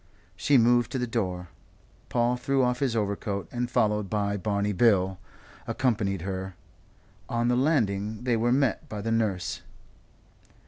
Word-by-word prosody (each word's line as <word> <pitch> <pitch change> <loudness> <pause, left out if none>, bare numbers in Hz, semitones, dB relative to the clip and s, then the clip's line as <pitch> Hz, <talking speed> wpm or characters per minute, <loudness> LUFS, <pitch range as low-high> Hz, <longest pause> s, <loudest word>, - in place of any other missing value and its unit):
She 140 +9 +3
moved 120 0 +4
to - - 0
the 125 - 0
door. 90 -7 -3 0.6
Paul 120 +1 +2
threw 135 +2 +1
off 125 0 +1
his 130 -5 0
overcoat 100 -2 -2
and, 120 0 -2
followed 105 -4 +1
by 100 -1 0
Barney 100 0 -1
Bill, 95 -3 +3 0.5
accompanied 105 -8 0
her. 95 -1 -4 0.7
On 120 0 +1
the 125 - +3
landing 110 -7 0
they 125 -2 +2
were 115 +2 +1
met 135 -2 +1
by 105 - -5
the 115 +2 -2
nurse. 105 -6 -1
110 Hz, 145 wpm, -27 LUFS, 100-120 Hz, 0.7 s, moved